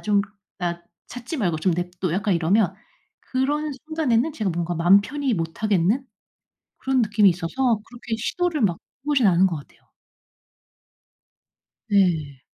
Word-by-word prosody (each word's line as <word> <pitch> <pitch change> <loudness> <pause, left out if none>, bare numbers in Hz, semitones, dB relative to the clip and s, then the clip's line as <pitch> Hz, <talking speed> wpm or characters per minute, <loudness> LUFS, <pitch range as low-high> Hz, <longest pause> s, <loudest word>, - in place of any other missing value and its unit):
좀 205 -1 +2 0.4
나 175 -1 -3 0.2
찾지 245 +6 -6
말고 180 - 0
좀 180 +2 +1
내버려 175 +1 -2
둬." 180 -3 0
약간 195 0 +1
이러면 185 +4 +2 0.5
그런 290 +3 -1
순간에는 315 -3 +1
제가 215 -9 -2
뭔가 175 0 -2
맘 175 +4 +5
편히 275 +4 -2
못 165 +3 -4
하겠는 210 +5 +2 0.7
그런 265 -1 +1
느낌이 210 -2 +4
있어서 210 +7 0
그렇게 240 -1 -5
시도를 325 +5 -1
막 180 -5 +2
해 - - -19 0.3
보진 280 -7 +3
않은 185 +1 +5
것 165 -4 -3
같아요. 145 - -14 2.1
네. 160 -9 +1
205 Hz, 275 characters per minute, -23 LUFS, 175-255 Hz, 2.1 s, 맘